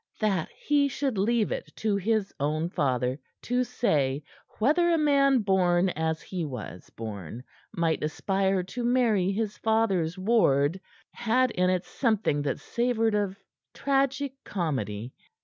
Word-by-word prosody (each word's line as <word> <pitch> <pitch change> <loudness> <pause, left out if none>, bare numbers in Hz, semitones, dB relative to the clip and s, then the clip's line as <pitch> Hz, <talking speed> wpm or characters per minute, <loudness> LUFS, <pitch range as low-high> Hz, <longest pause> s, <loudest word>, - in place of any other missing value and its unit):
That 195 -7 0
he 290 -1 +2
should 270 -5 -2
leave 220 +2 +1
it - - -4
to 215 -2 0
his 205 +1 0
own 155 +4 -1
father 130 -2 0 0.2
to 250 +1 +1
say 150 - 0 0.3
whether 310 +10 +3
a 335 - +3
man 275 -5 +3
born 185 -2 +3
as 160 -1 -2
he 180 -3 -4
was 125 - -7
born 110 0 -7 0.3
might 165 -6 0
aspire 190 +4 0
to 240 +7 -5
marry 235 -6 +2
his 210 +1 -3
father's 195 -7 +1
ward, 185 -6 +2 0.3
had 240 +2 +1
in 180 -2 +1
it 185 -1 0
something 215 - 0
that 145 -2 -2
savored 235 -2 0
of 200 -2 -1 0.4
tragi 275 0 0
comedy. 125 - -3
195 Hz, 135 wpm, -27 LUFS, 155-235 Hz, 0.4 s, whether